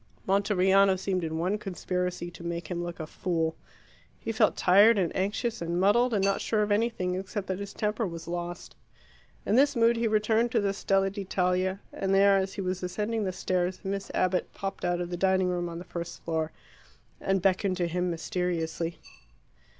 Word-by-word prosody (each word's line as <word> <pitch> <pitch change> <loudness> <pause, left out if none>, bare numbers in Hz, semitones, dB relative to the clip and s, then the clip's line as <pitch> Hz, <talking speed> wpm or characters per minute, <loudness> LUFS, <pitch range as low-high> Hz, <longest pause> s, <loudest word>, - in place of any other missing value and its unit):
Monteriano 195 0 +4
seemed 185 -1 -1
in 160 0 -2
one 185 +6 0
conspiracy 180 -2 -3
to 170 - -11
make 170 -1 -4
him 175 0 -2
look 175 0 -6
a 155 - -3
fool. 160 0 -1 0.6
He - - -3
felt 220 -1 +2
tired 205 +5 +6
and 180 -4 0
anxious 210 +4 -1
and 170 +1 -1
muddled, 235 +6 +4
and 200 -3 +2
not 195 0 +1
sure 215 -2 +1
of 210 - -2
anything 205 -4 +1
except 190 +2 -4
that 190 0 -3
his 200 0 -6
temper 215 +1 -1
was 165 -1 -8
lost. 175 0 -5 0.7
In - - 0
this 280 +2 +4
mood 230 0 +4
he 230 0 +1
returned 220 +2 +2
to 230 - +4
the 200 -1 0
Stella 195 -1 +1
d'Italia, 185 -1 -1
and 195 0 0
there, 200 0 +6
as 190 0 0
he - - -3
was 185 0 -2
ascending 210 +4 -2
the 185 - -1
stairs, 185 0 -1
Miss 195 0 -3
Abbott 185 0 +1
popped 195 -1 -5
out 175 0 0
of 175 0 -4
the 175 - -2
dining 190 0 +2
room 175 -1 -1
on 170 - -6
the 175 - -8
first 170 -1 -6
floor 160 -1 -1 0.7
and 195 0 +1
beckoned 185 0 +1
to 175 - +1
him 180 +1 -1
mysteriously. 170 -1 -2
190 Hz, 190 wpm, -28 LUFS, 175-200 Hz, 0.7 s, tired